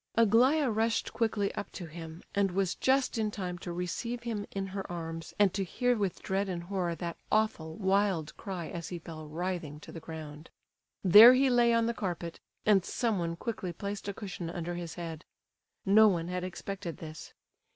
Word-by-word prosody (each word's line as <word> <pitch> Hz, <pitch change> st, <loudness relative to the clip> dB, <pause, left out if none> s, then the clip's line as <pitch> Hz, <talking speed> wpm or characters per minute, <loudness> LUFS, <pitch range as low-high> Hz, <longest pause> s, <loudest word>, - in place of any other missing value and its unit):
Aglaya 245 Hz, +7 st, +5 dB
rushed 225 Hz, +1 st, 0 dB
quickly 220 Hz, -3 st, 0 dB
up -, -, -5 dB
to 180 Hz, -, -6 dB
him, 160 Hz, 0 st, -9 dB
and 200 Hz, -1 st, +2 dB
was 190 Hz, 0 st, 0 dB
just 260 Hz, -2 st, +1 dB
in 215 Hz, -1 st, +1 dB
time 180 Hz, -4 st, -4 dB
to 175 Hz, -, -6 dB
receive 205 Hz, +8 st, -3 dB
him 220 Hz, -4 st, -3 dB
in 195 Hz, -1 st, -3 dB
her 195 Hz, -1 st, -5 dB
arms, 165 Hz, -1 st, -6 dB
and 200 Hz, -3 st, +4 dB
to 195 Hz, 0 st, 0 dB
hear 245 Hz, +6 st, +1 dB
with 200 Hz, -5 st, -2 dB
dread 195 Hz, +1 st, 0 dB
and 175 Hz, -2 st, -3 dB
horror 180 Hz, -2 st, -2 dB
that 170 Hz, -1 st, -5 dB
awful, 215 Hz, -7 st, +1 dB
wild 190 Hz, -5 st, +1 dB
cry 185 Hz, -5 st, -5 dB
as 170 Hz, -1 st, -6 dB
he 175 Hz, -, -4 dB
fell 160 Hz, -2 st, -9 dB
writhing 165 Hz, -2 st, -4 dB
to -, -, -11 dB
the 165 Hz, -, -7 dB
ground. 155 Hz, -1 st, -9 dB, 0.5 s
There 215 Hz, +7 st, +10 dB
he 265 Hz, 0 st, +4 dB
lay 240 Hz, -1 st, +5 dB
on 230 Hz, 0 st, +3 dB
the 235 Hz, -, 0 dB
carpet, 175 Hz, -5 st, -4 dB, 0.3 s
and 200 Hz, -3 st, +5 dB
someone 185 Hz, -7 st, -1 dB
quickly 185 Hz, -2 st, -4 dB
placed 200 Hz, +3 st, -5 dB
a 200 Hz, -, -2 dB
cushion 185 Hz, -5 st, -5 dB
under 175 Hz, 0 st, -4 dB
his 170 Hz, -2 st, -5 dB
head. 165 Hz, -2 st, -6 dB, 0.6 s
No 215 Hz, +2 st, +7 dB
one 170 Hz, -4 st, 0 dB
had 180 Hz, 0 st, -2 dB
expected 185 Hz, -2 st, -5 dB
this. 155 Hz, -1 st, -9 dB
190 Hz, 185 wpm, -31 LUFS, 170-215 Hz, 0.6 s, There